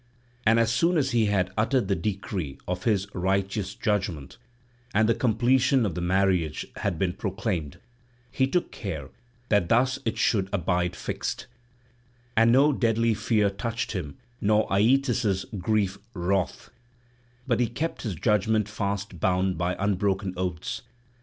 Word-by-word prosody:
And 115 +1 +5
as 115 0 +3
soon 170 +9 +2
as 135 -3 +1
he 115 -3 +3
had 95 -3 +1
uttered 115 +1 +1
the 100 - +2
decree 95 -5 -3
of 90 0 -3
his 105 -4 +2
righteous 95 +2 -1
judgement, 100 - -2 0.6
and 110 +1 +4
the 115 - +4
completion 125 +2 +3
of 95 - -1
the 90 - -4
marriage 90 -3 +1
had 100 -5 -1
been 90 +1 0
proclaimed, 95 - -3 0.5
he 130 +1 +2
took 175 +6 0
care 80 -10 -5 0.4
that 105 -5 +2
thus 130 +3 +3
it 115 - -2
should 95 -4 +2
abide 90 -2 0
fixed; - - -4 0.9
and 115 +1 +5
no 140 +4 +5
deadly 115 -2 +2
fear 105 -1 +1
touched 115 +3 -3
him 85 -9 -5 0.2
nor 105 +1 +3
Aeetes' 115 -1 +2
grievous 100 0 0
wrath, 95 +1 -1 0.7
but - - +1
he 120 - +3
kept 155 +9 -3
his 105 -7 -3
judgement 105 +3 +1
fast 100 -3 -3
bound 95 +2 +1
by 85 +2 -1
unbroken 100 -1 0
oaths. 90 +4 -3
100 Hz, 145 wpm, -26 LUFS, 95-115 Hz, 0.9 s, And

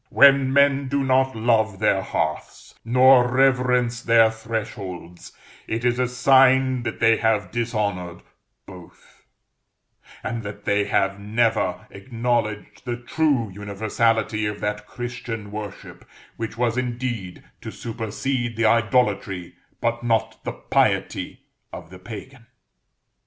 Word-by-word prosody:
When 140 -1 +5
men 140 0 +3
do 140 +1 0
not 130 0 +2
love 110 -3 +1
their 95 -1 +2
hearths, - - -4
nor 125 +1 +5
reverence 125 -2 +2
their 115 -1 +4
thresholds, 100 -6 -6 0.4
it 115 +2 -3
is 120 0 +1
a 125 - +2
sign 130 0 +4
that 120 - -5
they 115 -1 +4
have 105 -4 0
dishonored 100 -7 -3 0.4
both, 90 -3 -16 1.0
and 115 -1 -3
that 100 -1 -9
they 100 0 +1
have 100 0 0
never 110 +2 0
acknowledged 115 -1 -3
the 120 -2 -3
true 125 -3 0
universality 110 +2 -1
of 105 0 -5
that 105 0 -3
Christian 120 -4 -6
worship 105 -1 -8 0.3
which 115 0 -6
was 120 0 0
indeed 120 -7 -4 0.2
to - - -7
supersede 120 +2 -4
the 115 - +1
idolatry, 105 -5 +1 0.3
but 120 0 -1
not 115 -2 -1
the - - -4
piety, - - -1 0.3
of - - -10
the 95 - -11
pagan. 115 +5 -10
115 Hz, 120 wpm, -23 LUFS, 105-125 Hz, 1.0 s, When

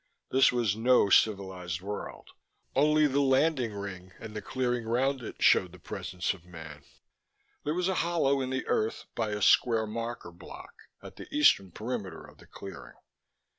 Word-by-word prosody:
This 135 0 +5
was 120 -5 0
no 115 -3 +3
civilized 95 -6 +1
world. 100 +3 -7 0.4
Only 150 +2 +4
the 140 -1 +1
landing 135 -2 +2
ring 95 -2 -7
and 110 - -9
the 105 - -4
clearing 125 +1 -2
around 130 +3 0
it 115 - -6
showed 90 -2 +4
the - - -11
presence 90 0 -4
of 95 -3 -15
man. 80 -4 -11 0.8
There 150 +2 -1
was 180 0 0
a 190 - +1
hollow 155 -5 +1
in 130 - -3
the 130 0 -2
earth 110 +1 -1
by 110 -2 -2
a 105 -1 -2
square 115 -3 +4
marker 115 -3 -5
block 85 - -12 0.3
at - - -11
the - - -9
eastern 290 - +4
perimeter 105 -3 -5
of - - -17
the - - -17
clearing. 70 -11 -10
110 Hz, 170 wpm, -29 LUFS, 95-130 Hz, 0.8 s, This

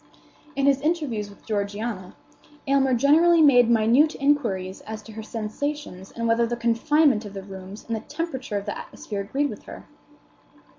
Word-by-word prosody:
In 275 0 +1
his 275 -1 +3
interviews 290 -10 -1
with 200 - -17
Georgiana, 205 -2 -3 0.5
Aylmer 270 -2 +3
generally 320 +6 +5
made 245 -5 +6
minute 235 +7 +4
inquiries 230 -10 0
as 215 -1 -6
to 220 - -12
her 220 +1 -7
sensations 220 -1 -5
and 230 0 -3
whether 230 +1 +2
the 240 +1 -3
confinement 235 +2 +2
of 205 -1 -9
the 195 - -6
rooms 190 +1 -10
and 230 - -2
the - - -3
temperature 265 -5 -4
of 200 - -5
the 205 - -3
atmosphere 205 -2 -6
agreed 275 +9 -1
with - - -10
her. - - -10
230 Hz, 165 wpm, -24 LUFS, 210-280 Hz, 0.5 s, made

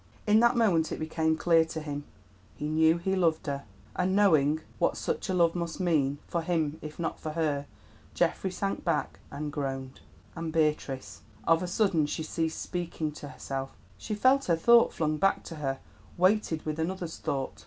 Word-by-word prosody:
In 215 0 +5
that 235 +1 +4
moment 175 -9 +3
it - - -2
became 160 0 0
clear 165 0 +4
to 160 0 -5
him: 145 -1 -5 0.5
he 150 - -4
knew 160 +2 +4
he 190 +3 -1
loved 165 -4 +1
her, 140 -2 -3 0.3
and 185 +1 +1
knowing 160 -7 +4 0.2
what - - +2
such 465 - -2
a - - +1
love 170 -2 +4
must 170 0 -4
mean, 150 -6 +1
for 170 - -1
him 160 -3 -1
if 150 0 -8
not 165 -1 -3
for 155 - -5
her, 150 -3 -1 0.5
Geoffrey 190 - +1
sank 195 +2 -3
back 165 -4 -1
and 150 0 -5
groaned. 135 -2 -4 0.4
And 165 -1 -4
Beatrice? 150 -4 -1 0.2
Of 165 0 +3
a 180 - -2
sudden 180 -5 +2
she 160 - -3
ceased 160 0 -2
speaking 170 -3 -3
to 150 -1 -9
herself; 135 -1 -5 0.2
she 210 - -4
felt 260 +5 +4
her 170 - +3
thought 235 +8 +5
flung 155 -1 -1
back 195 +5 +2
to 165 - -8
her 135 -2 -2 0.4
weighted 185 -3 +2
with 155 0 -3
another's 175 0 -3
thought. 135 -1 -3
160 Hz, 185 wpm, -29 LUFS, 150-180 Hz, 0.5 s, In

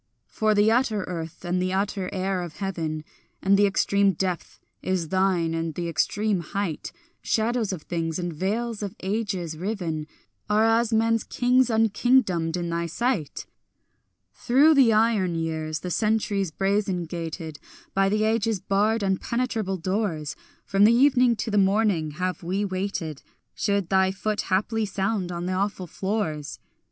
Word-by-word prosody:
For 215 -1 0
the 205 +2 +4
utter 225 -4 +1
earth 165 -1 -6
and 180 +1 0
the 185 0 -1
utter 195 -1 -1
air 190 -1 -1
of 175 -3 -7
heaven 165 -6 -3 0.4
And 195 +1 +3
the 205 +1 +5
extreme 200 0 +2
depth 180 0 -3 0.2
is 180 -4 -1
thine 185 -3 +1
and 165 -1 -2
the 175 -1 -3
extreme 200 +5 0
height; 175 -1 -4 0.3
Shadows 225 -1 0
of 175 -5 -5
things 165 -2 -2
and 175 -2 -3
veils 215 +7 -2
of 200 -2 -4
ages 190 -5 -2
riven 165 -4 -3 0.4
Are 215 +1 +4
as 225 +1 +3
men's 225 0 +2
kings 250 0 +2
unkingdomed 220 -6 +2
in 170 -1 -3
thy 170 0 -1
sight. 185 - -2 0.9
Through 280 +6 +4
the 265 -6 +5
iron 215 -5 +2
years, 160 -1 -3
the 180 - -4
centuries 210 -2 +1
brazen 195 +1 0
gated, 165 -2 -6 0.3
By 195 0 +3
the 215 +1 +1
ages' 220 -1 +1
barred 210 +4 +1
impenetrable 210 +1 -1
doors, 180 -4 -2 0.3
From 195 +1 +2
the 220 +3 +7
evening 250 -1 +4
to 220 - -3
the 205 - +3
morning 195 -6 +2
have 185 +1 -2
we 190 +4 -1
waited, 185 -6 -3 0.3
Should 200 -4 0
thy 190 -1 +3
foot 210 +2 -2
haply 215 +3 +1
sound 195 -2 -1
on 175 0 -4
the 185 - -1
awful 195 0 -1
floors. 170 -6 -3
195 Hz, 150 wpm, -25 LUFS, 175-215 Hz, 0.9 s, the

